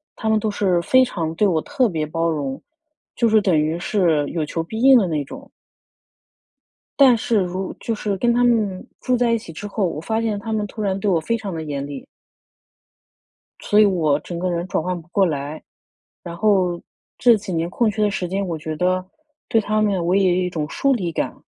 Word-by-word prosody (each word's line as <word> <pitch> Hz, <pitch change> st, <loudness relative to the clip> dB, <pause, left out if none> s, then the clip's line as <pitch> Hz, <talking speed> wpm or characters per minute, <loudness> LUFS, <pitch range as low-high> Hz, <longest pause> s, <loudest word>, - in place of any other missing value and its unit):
他 220 Hz, -, -3 dB
们 220 Hz, 0 st, +3 dB
都 215 Hz, 0 st, -1 dB
是 185 Hz, -4 st, +1 dB
非 260 Hz, +8 st, +4 dB
常 165 Hz, -9 st, -3 dB
对 205 Hz, +5 st, +3 dB
我 160 Hz, -4 st, +1 dB
特 250 Hz, -4 st, 0 dB
别 155 Hz, -3 st, -2 dB
包 165 Hz, +2 st, -1 dB
容， 140 Hz, -4 st, -3 dB, 0.5 s
就 235 Hz, -, +2 dB
是 220 Hz, 0 st, +4 dB
等 185 Hz, -5 st, +2 dB
于 155 Hz, +2 st, 0 dB
是 170 Hz, -7 st, +1 dB
有 160 Hz, -3 st, -2 dB
求 165 Hz, +2 st, -3 dB
必 220 Hz, +7 st, -6 dB
应 270 Hz, 0 st, +8 dB
的 205 Hz, -6 st, +2 dB
那 150 Hz, -4 st, -1 dB
种。 -, -, -11 dB, 1.5 s
但 255 Hz, -4 st, +7 dB
是 225 Hz, 0 st, 0 dB
如 185 Hz, +1 st, -3 dB
就 230 Hz, -, -2 dB
是 205 Hz, -1 st, -2 dB
跟 235 Hz, +3 st, +2 dB
他 245 Hz, +1 st, +2 dB
们 215 Hz, -5 st, +1 dB
住 250 Hz, -1 st, 0 dB
在 240 Hz, -1 st, +2 dB
一 230 Hz, -, +3 dB
起 215 Hz, -6 st, -10 dB
之 205 Hz, +6 st, -7 dB
后， 205 Hz, -1 st, -1 dB
我 150 Hz, -, -4 dB
发 220 Hz, +6 st, -1 dB
现 215 Hz, -3 st, -1 dB
他 220 Hz, +1 st, -4 dB
们 210 Hz, -1 st, -1 dB
突 215 Hz, -, -8 dB
然 195 Hz, -1 st, -1 dB
对 205 Hz, -, 0 dB
我 170 Hz, -, +3 dB
非 160 Hz, +9 st, -1 dB
常 200 Hz, -5 st, -6 dB
地 160 Hz, -, -4 dB
严 140 Hz, -2 st, -4 dB
厉。 140 Hz, -2 st, -8 dB, 1.5 s
所 210 Hz, -, +2 dB
以 215 Hz, -, +7 dB
我 160 Hz, -7 st, +2 dB
整 170 Hz, +1 st, -7 dB
个 185 Hz, 0 st, -1 dB
人 175 Hz, +1 st, -2 dB
转 165 Hz, -, -1 dB
换 180 Hz, -1 st, -2 dB
不 165 Hz, -, -23 dB
过 195 Hz, +1 st, +3 dB
来， 150 Hz, -1 st, -3 dB, 0.6 s
然 170 Hz, -1 st, -7 dB
后 185 Hz, -4 st, +2 dB, 0.4 s
这 240 Hz, -2 st, +5 dB
几 195 Hz, -2 st, -6 dB
年 165 Hz, +1 st, -1 dB
空 220 Hz, +4 st, +1 dB
缺 215 Hz, +1 st, -3 dB
的 205 Hz, -, +2 dB
时 180 Hz, -2 st, -3 dB
间 195 Hz, +2 st, -2 dB
我 165 Hz, -2 st, -3 dB
觉 155 Hz, 0 st, -5 dB
得 185 Hz, +3 st, 0 dB, 0.4 s
对 225 Hz, -, +2 dB
他 215 Hz, +1 st, 0 dB
们 195 Hz, -5 st, +1 dB
我 180 Hz, +2 st, +2 dB
也 195 Hz, -2 st, +4 dB
有 185 Hz, -, +1 dB
一 180 Hz, -, -1 dB
种 155 Hz, -3 st, -4 dB
疏 275 Hz, -1 st, +1 dB
离 180 Hz, -8 st, -2 dB
感。 -, -, -4 dB
185 Hz, 240 characters per minute, -21 LUFS, 165-215 Hz, 1.5 s, 应